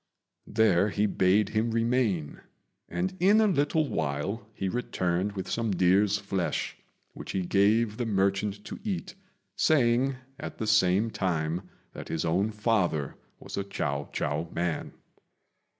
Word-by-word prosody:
There 105 -3 +3
he 105 +1 +1
bade 100 +1 +3
him 110 +2 0
remain, 115 - 0 0.5
and 185 +1 -2
in 200 +5 +5
a 220 - +5
little 155 -4 +2
while 80 - -2
he 95 -3 -4
returned 95 -3 -1
with 95 -2 -5
some 115 -1 -1
deer's 95 +2 +3
flesh, 100 -3 -2 0.4
which - - -7
he 95 - 0
gave 105 +4 +2
the 120 -2 -2
merchant 100 0 0
to - - -7
eat, 190 -4 -3 0.4
saying 130 -3 +3 0.2
at - - -7
the 110 - -3
same 105 +1 +3
time 90 -1 -2 0.2
that - - -8
his 80 - -1
own 90 +6 +1
father 105 - 0 0.3
was - - -8
a 100 - 0
Chiao 70 -7 -3
chou 75 +3 -2
man. 85 -1 -2
100 Hz, 140 wpm, -28 LUFS, 90-115 Hz, 0.5 s, in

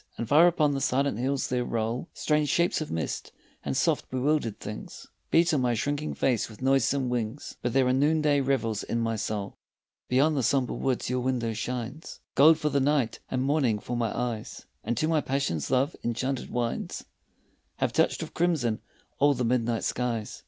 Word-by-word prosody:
And 115 - -3
far 155 +4 +6
upon 155 -4 +2
the 135 - -2
silent 135 -3 +1
hills 135 +2 0
there 125 -1 0
roll 115 +5 -2
Strange 150 -1 +1
shapes 170 -1 +2
of 155 - -4
mist, 80 -2 -3 0.3
and - - -2
soft - - +1
bewildered 130 -3 0
things 105 - -8 0.2
Beat 165 0 +4
on 145 - +2
my 120 -1 +1
shrinking 145 +6 -2
face 125 -5 +1
with 110 - -13
noisome 135 0 +2
wings, 120 +2 -3
But 120 - -1
there 135 -1 +4
are 125 - +2
noonday 145 +1 +3
revels 125 -6 0
in 115 - -2
my 115 -1 0
soul. 105 -2 -4 0.5
Beyond 145 +5 +3
the 135 - +1
sombre 130 +1 +1
woods 130 -2 -1
your 125 - +1
window 125 -3 -1
shines 125 +6 -5
Gold 155 +3 +7
for 155 -1 0
the 140 - +1
night 140 -3 +1
and 130 0 -1
morning 135 -6 +2
for 120 +4 -5
my 115 -3 0
eyes, 120 -3 -4 0.2
And 120 - -2
to 155 - +1
my 160 -2 +2
passion 135 - -1
love's 135 +4 +1
enchanted 125 +3 -2
wines 120 -1 -3 0.7
Have - - -1
touched - - +2
with - - -9
crimson 150 -11 0 0.4
all 145 0 +4
the 125 -1 -1
midnight 115 -1 0
skies. 120 -3 -2
130 Hz, 185 wpm, -27 LUFS, 115-145 Hz, 0.7 s, Gold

